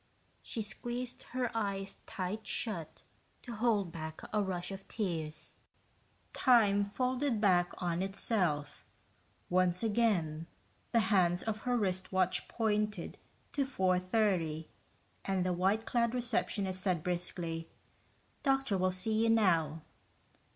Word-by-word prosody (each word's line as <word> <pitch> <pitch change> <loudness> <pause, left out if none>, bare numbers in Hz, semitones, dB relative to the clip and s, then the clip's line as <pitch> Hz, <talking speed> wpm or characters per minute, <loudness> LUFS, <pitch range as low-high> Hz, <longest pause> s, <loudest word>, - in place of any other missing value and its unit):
She 225 - -4
squeezed 240 +4 -4
her 250 -2 -1
eyes 200 -3 -2
tight 205 +4 -4
shut 185 -9 -2 0.4
to 240 - -6
hold 215 -5 +1
back 160 -2 -6
a 210 - +3
rush 185 -2 -2
of 195 0 -8
tears. 165 -7 -3 0.8
Time 210 -5 +5
folded 255 +3 0
back 180 -4 +4
on 175 -1 -1
itself. 180 -7 -1 0.6
Once 180 +1 +2
again, 195 -9 +1 0.4
the 230 - +4
hands 175 -2 +3
of 220 -1 -2
her 245 - +3
wristwatch 185 -2 +1
pointed 210 -4 -1 0.3
to 285 - +2
4:30 185 - +1 0.6
and 190 -2 0
the 180 - +1
white 195 +5 +1
clad 235 0 +1
receptionist 205 -6 0
said 180 -5 +1
briskly, 175 -2 -3 0.7
"Doctor 270 -8 +2
will 185 0 +3
see 185 +4 -2
you 230 - +3
now." 165 -8 +3
195 Hz, 115 wpm, -33 LUFS, 180-225 Hz, 0.8 s, Time